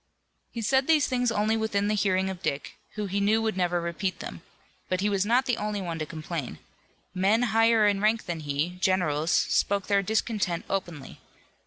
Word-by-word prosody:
He 230 Hz, -, -5 dB
said 265 Hz, +5 st, +2 dB
these 315 Hz, -3 st, +4 dB
things 250 Hz, -2 st, 0 dB
only 215 Hz, 0 st, +1 dB
within 215 Hz, -2 st, 0 dB
the 210 Hz, -, +1 dB
hearing 190 Hz, -2 st, +1 dB
of 185 Hz, -1 st, -9 dB
Dick, 140 Hz, -5 st, -3 dB, 0.2 s
who 210 Hz, -1 st, -2 dB
he 200 Hz, +1 st, -2 dB
knew 210 Hz, +2 st, +3 dB
would 220 Hz, -2 st, -1 dB
never 175 Hz, -1 st, +1 dB
repeat 170 Hz, +3 st, -3 dB
them. -, -, -8 dB, 0.5 s
But 185 Hz, 0 st, 0 dB
he 205 Hz, -, +1 dB
was 200 Hz, 0 st, 0 dB
not 250 Hz, +3 st, +3 dB
the 245 Hz, -, 0 dB
only 210 Hz, 0 st, -2 dB
one 170 Hz, -4 st, -4 dB
to 155 Hz, -, -3 dB
complain. 155 Hz, -3 st, -5 dB, 0.6 s
Men 200 Hz, +5 st, +2 dB
higher 225 Hz, -1 st, +4 dB
in 200 Hz, -1 st, +1 dB
rank 220 Hz, +2 st, +2 dB
than 170 Hz, -2 st, -4 dB
he, 150 Hz, +4 st, -2 dB
generals, 170 Hz, -5 st, +1 dB
spoke 200 Hz, +2 st, +2 dB
their 200 Hz, -1 st, +2 dB
discontent 205 Hz, -3 st, -1 dB
openly. 175 Hz, -7 st, -4 dB
200 Hz, 190 wpm, -27 LUFS, 175-220 Hz, 0.6 s, these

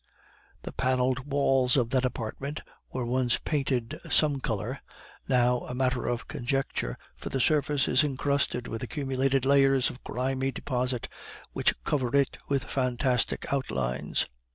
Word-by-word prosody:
The -, -, -5 dB
paneled 130 Hz, +1 st, 0 dB
walls 135 Hz, -2 st, +3 dB
of 120 Hz, -2 st, +1 dB
that 130 Hz, -1 st, +2 dB
apartment 130 Hz, +5 st, -4 dB, 0.3 s
were 130 Hz, -2 st, -2 dB
once 125 Hz, 0 st, +1 dB
painted 135 Hz, -6 st, -1 dB
some 145 Hz, -3 st, +4 dB
color, 120 Hz, +2 st, -3 dB, 0.5 s
now 125 Hz, -1 st, +3 dB
a 125 Hz, -, -5 dB
matter 130 Hz, -1 st, 0 dB
of 120 Hz, -2 st, -2 dB
conjecture, 120 Hz, -, -2 dB, 0.2 s
for -, -, -7 dB
the 135 Hz, -, -1 dB
surface 145 Hz, 0 st, +3 dB
is 130 Hz, +4 st, +4 dB
incrusted 140 Hz, -3 st, 0 dB
with 115 Hz, -, -5 dB
accumulated 135 Hz, -2 st, 0 dB
layers 135 Hz, -1 st, +4 dB
of 125 Hz, -, -14 dB
grimy 130 Hz, +1 st, -1 dB
deposit, 125 Hz, -1 st, -2 dB, 0.5 s
which -, -, +2 dB
cover 130 Hz, -, 0 dB
it 140 Hz, -2 st, +1 dB
with 140 Hz, -2 st, +1 dB
fantastic 125 Hz, 0 st, 0 dB
outlines. 65 Hz, -, -1 dB
130 Hz, 135 wpm, -28 LUFS, 125-135 Hz, 0.5 s, some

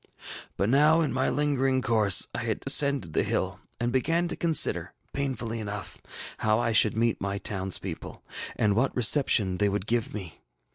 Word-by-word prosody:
ŌĆ£But 100 Hz, -, 0 dB
now, 150 Hz, +4 st, +4 dB
in 145 Hz, -7 st, -1 dB
my 130 Hz, 0 st, 0 dB
lingering 135 Hz, -3 st, 0 dB
course 110 Hz, -4 st, +4 dB
I -, -, -4 dB
had -, -, -3 dB
descended 140 Hz, -, +3 dB
the -, -, +2 dB
bill, -, -, -2 dB, 0.2 s
and 120 Hz, 0 st, -1 dB
began 165 Hz, +7 st, 0 dB
to 175 Hz, -, -4 dB
consider, 165 Hz, -3 st, +1 dB, 0.2 s
painfully 125 Hz, -5 st, -3 dB
enough, 105 Hz, -2 st, -7 dB, 0.4 s
how 110 Hz, 0 st, +1 dB
I 115 Hz, -1 st, -1 dB
should 110 Hz, 0 st, +4 dB
meet 115 Hz, 0 st, 0 dB
my 100 Hz, 0 st, -3 dB
townspeople, 95 Hz, -3 st, -5 dB, 0.3 s
and 105 Hz, -2 st, +1 dB
what 130 Hz, +5 st, 0 dB
reception 110 Hz, -6 st, +3 dB
they 105 Hz, -1 st, +2 dB
would 100 Hz, -1 st, -3 dB
give 115 Hz, 0 st, -2 dB
me. 95 Hz, -6 st, -9 dB
115 Hz, 170 wpm, -26 LUFS, 100-135 Hz, 0.4 s, now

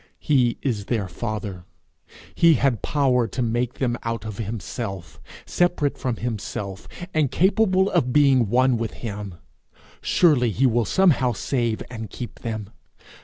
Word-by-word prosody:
He 125 Hz, -5 st, +2 dB
is 110 Hz, -7 st, -1 dB
their 110 Hz, -5 st, -1 dB
Father; 105 Hz, -2 st, -5 dB, 0.7 s
he 170 Hz, -2 st, +5 dB
had 130 Hz, -8 st, +1 dB
power 130 Hz, -5 st, +2 dB
to 120 Hz, +5 st, -4 dB
make 120 Hz, +1 st, -1 dB
them 120 Hz, -2 st, -1 dB
out 115 Hz, -1 st, -4 dB
of 110 Hz, -1 st, -6 dB
himself, 100 Hz, -4 st, -5 dB, 0.2 s
separate 175 Hz, -5 st, +1 dB
from 125 Hz, -3 st, -2 dB
himself, 105 Hz, -4 st, -5 dB, 0.3 s
and 155 Hz, -4 st, +2 dB
capable 190 Hz, -, +3 dB
of 125 Hz, -, +1 dB
being 135 Hz, -6 st, +4 dB
one 130 Hz, +1 st, +3 dB
with 115 Hz, -1 st, -3 dB
him: 100 Hz, -4 st, -5 dB, 0.7 s
surely 145 Hz, -9 st, +3 dB
he 115 Hz, +6 st, +1 dB
will 120 Hz, -2 st, +2 dB
somehow 150 Hz, -, +3 dB
save 120 Hz, 0 st, -1 dB
and 110 Hz, -3 st, -6 dB
keep 120 Hz, +4 st, -8 dB
them! 110 Hz, -3 st, -5 dB
120 Hz, 140 wpm, -23 LUFS, 110-135 Hz, 0.7 s, he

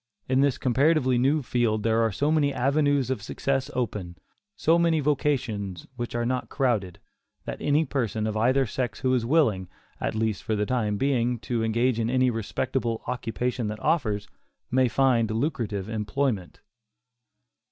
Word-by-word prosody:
In 130 Hz, +1 st, +3 dB
this 140 Hz, -2 st, +2 dB
comparatively 130 Hz, 0 st, +2 dB
new 140 Hz, +4 st, +2 dB
field 115 Hz, -4 st, 0 dB
there 115 Hz, +1 st, +2 dB
are 115 Hz, -1 st, +2 dB
so 145 Hz, +10 st, 0 dB
many 150 Hz, -3 st, +2 dB
avenues 140 Hz, 0 st, +1 dB
of 130 Hz, -, -2 dB
success 135 Hz, +6 st, -2 dB
open, 100 Hz, -8 st, -3 dB, 0.4 s
so 165 Hz, +2 st, +3 dB
many 165 Hz, -2 st, +3 dB
vocations 120 Hz, -, -1 dB
which 120 Hz, -1 st, -5 dB
are 120 Hz, 0 st, 0 dB
not 125 Hz, +1 st, -2 dB
crowded, 110 Hz, -10 st, 0 dB, 0.5 s
that -, -, -6 dB
any 150 Hz, +2 st, +2 dB
person 115 Hz, -7 st, -1 dB
of 110 Hz, -1 st, -2 dB
either 130 Hz, +5 st, +3 dB
sex 115 Hz, -1 st, -3 dB
who 130 Hz, -1 st, +2 dB
is 120 Hz, -3 st, +1 dB
willing, 110 Hz, -, +2 dB, 0.3 s
at -, -, -2 dB
least 110 Hz, -2 st, -1 dB
for 110 Hz, -, -1 dB
the 105 Hz, 0 st, 0 dB
time 105 Hz, -4 st, 0 dB
being, 125 Hz, -1 st, +1 dB
to 120 Hz, -2 st, -1 dB
engage 115 Hz, +2 st, +1 dB
in 115 Hz, 0 st, 0 dB
any 130 Hz, 0 st, +3 dB
respectable 115 Hz, +1 st, -2 dB
occupation 125 Hz, 0 st, -2 dB
that 105 Hz, +1 st, -4 dB
offers, 105 Hz, -11 st, 0 dB, 0.4 s
may 130 Hz, 0 st, +4 dB
find 120 Hz, -2 st, +2 dB
lucrative 110 Hz, -, -2 dB
employment. 110 Hz, -2 st, -2 dB
120 Hz, 160 wpm, -26 LUFS, 110-135 Hz, 0.5 s, may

